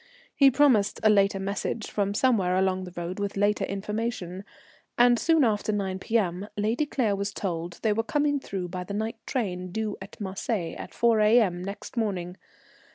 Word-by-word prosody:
He 275 Hz, -1 st, +7 dB
promised 260 Hz, -7 st, +3 dB
a 215 Hz, -, +6 dB
later 200 Hz, -1 st, +3 dB
message 200 Hz, +3 st, -3 dB
from 200 Hz, -1 st, -1 dB
somewhere 205 Hz, -8 st, +2 dB
along 185 Hz, 0 st, +1 dB
the 180 Hz, -, -10 dB
road 175 Hz, +3 st, -4 dB
with 200 Hz, 0 st, -3 dB
later 205 Hz, +1 st, +2 dB
information, 200 Hz, -2 st, -4 dB, 0.5 s
and 240 Hz, -1 st, +5 dB
soon 325 Hz, -3 st, +3 dB
after 215 Hz, -2 st, +1 dB
9 190 Hz, -2 st, -2 dB
P.M. 195 Hz, -3 st, 0 dB
Lady 225 Hz, +8 st, 0 dB
Claire 230 Hz, -8 st, 0 dB
was 200 Hz, +1 st, -2 dB
told 175 Hz, -2 st, -4 dB
they 215 Hz, -2 st, +3 dB
were 225 Hz, -, +1 dB
coming 290 Hz, +4 st, 0 dB
through 190 Hz, -8 st, -5 dB
by 180 Hz, 0 st, -4 dB
the 200 Hz, +2 st, -6 dB
night 220 Hz, +2 st, -2 dB
train, 185 Hz, -8 st, -2 dB
due 215 Hz, +1 st, -3 dB
at 195 Hz, -, -11 dB
Marseilles 195 Hz, -2 st, -3 dB
at -, -, -7 dB
4 235 Hz, -2 st, +3 dB
A.M. 210 Hz, -5 st, +4 dB
next 200 Hz, +6 st, -7 dB
morning. 185 Hz, -5 st, -2 dB
205 Hz, 175 wpm, -27 LUFS, 190-225 Hz, 0.5 s, He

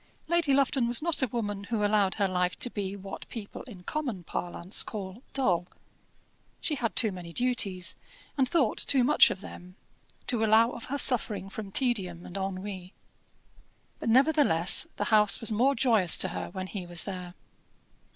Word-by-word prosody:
Lady 340 Hz, -3 st, +1 dB
Lufton 270 Hz, -2 st, +2 dB
was 240 Hz, +5 st, -1 dB
not 335 Hz, -3 st, 0 dB
a 260 Hz, -, +2 dB
woman 205 Hz, -3 st, -4 dB
who 215 Hz, -1 st, -1 dB
allowed 205 Hz, -2 st, +2 dB
her 200 Hz, -2 st, +1 dB
life 180 Hz, -1 st, 0 dB
to 245 Hz, -, 0 dB
be 200 Hz, -1 st, -4 dB
what 195 Hz, 0 st, -9 dB
people 215 Hz, -4 st, -8 dB
in 200 Hz, -8 st, -12 dB
common 250 Hz, -, -3 dB
parlance 175 Hz, +3 st, -2 dB
call 200 Hz, 0 st, -6 dB
dull. 180 Hz, -10 st, +1 dB, 0.9 s
She 310 Hz, -, -2 dB
had 240 Hz, -5 st, -2 dB
too 220 Hz, -3 st, +2 dB
many 180 Hz, -2 st, -8 dB
duties, 205 Hz, -5 st, 0 dB, 0.4 s
and 265 Hz, -3 st, +1 dB
thought 285 Hz, -10 st, +2 dB
too 265 Hz, -3 st, +2 dB
much 295 Hz, +5 st, +6 dB
of 190 Hz, -, -5 dB
them, 180 Hz, -2 st, -11 dB, 0.5 s
to 235 Hz, -4 st, +1 dB
allow 220 Hz, +2 st, +4 dB
of 235 Hz, -, -7 dB
her 280 Hz, -, -3 dB
suffering 210 Hz, -8 st, +2 dB
from 200 Hz, -1 st, -7 dB
tedium 190 Hz, -9 st, 0 dB
and 180 Hz, -, -11 dB
ennui. 190 Hz, -1 st, -5 dB, 1.0 s
But -, -, -3 dB
nevertheless 260 Hz, -, +3 dB
the -, -, -2 dB
house 210 Hz, -1 st, +5 dB
was 225 Hz, -, -1 dB
more 255 Hz, +6 st, +2 dB
joyous 225 Hz, -8 st, +4 dB
to -, -, +1 dB
her 90 Hz, -1 st, -5 dB
when 185 Hz, -, -6 dB
he 185 Hz, -2 st, -6 dB
was 175 Hz, -1 st, 0 dB
there. 180 Hz, -2 st, -7 dB
210 Hz, 170 wpm, -28 LUFS, 185-245 Hz, 1.0 s, much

